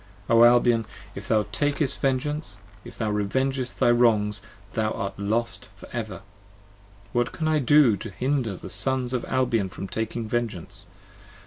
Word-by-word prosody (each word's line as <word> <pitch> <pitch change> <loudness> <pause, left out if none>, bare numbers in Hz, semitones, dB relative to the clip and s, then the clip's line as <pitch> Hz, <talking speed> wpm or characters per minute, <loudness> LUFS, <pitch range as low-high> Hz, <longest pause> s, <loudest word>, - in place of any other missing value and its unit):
O 115 0 +6
Albion, 120 -1 +5 0.3
if - - -8
thou 110 -2 +2
takest 145 +2 0
vengeance, 135 -4 -1 0.2
if - - -11
thou 110 -2 -1
revengest 130 +5 -1
thy 120 - +4
wrongs, 110 -4 +3 0.3
Thou 110 -1 0
art 100 -2 -3 0.6
for - - -13
ever - - -3
lost! - - -10 0.9
What 120 -1 +1
can 160 - -3
I 155 -1 +3
do 140 -4 +5
to - - -7
hinder 125 -1 -1
the - - -9
Sons 130 -2 -1
Of 125 - -1
Albion 120 -6 +1
from 95 +1 -7
taking 110 +2 -3
vengeance 110 -6 -3
120 Hz, 150 wpm, -25 LUFS, 110-130 Hz, 0.9 s, O